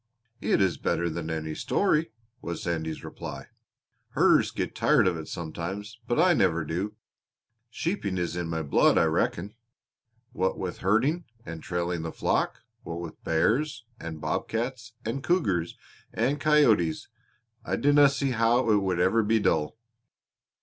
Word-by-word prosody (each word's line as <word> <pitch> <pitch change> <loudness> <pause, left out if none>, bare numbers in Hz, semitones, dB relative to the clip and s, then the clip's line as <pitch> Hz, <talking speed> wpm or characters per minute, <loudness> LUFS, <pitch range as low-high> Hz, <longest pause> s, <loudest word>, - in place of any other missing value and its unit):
"It - - +1
is 95 -3 +1
better 85 -1 0
than 80 0 -4
any 80 -1 -3
story," 160 - +1 0.3
was 85 - -5
Sandy's 80 -2 -3
reply. - - -8 0.6
"Herders - - +4
get - - -3
tired - - +3
of 90 - +1
it 80 -1 -6
sometimes, 95 +7 -6
but 120 - 0
I 180 +1 +5
never 85 - +2
do. 90 +7 -3 0.7
Sheeping 115 - -2
is 90 -1 -2
in 90 -1 -3
my 80 -1 -2
blood, 70 - +4
I - - +5
reckon. 100 +5 0 0.8
What 95 -6 -1
with 90 -2 -4
herding 130 - +1 0.2
and 85 -1 -7
trailing 85 -1 -2
the 80 0 -4
flock, - - -1 0.2
what 85 0 -6
with 85 -2 -8
bears, 115 - +1
and 80 -1 -6
bob - - -2
cats, 115 0 -4
and 115 +5 -2
cougars, 100 - 0 0.3
and 145 +3 0
coyotes 120 - +3 0.6
I - - -1
dinna 145 0 +5
see 140 -1 -1
how 115 0 +3
it 105 - +5
would 95 -3 0
ever 95 +6 +3
be 110 +1 +2
dull." 95 -2 0
95 Hz, 150 wpm, -27 LUFS, 85-120 Hz, 0.8 s, I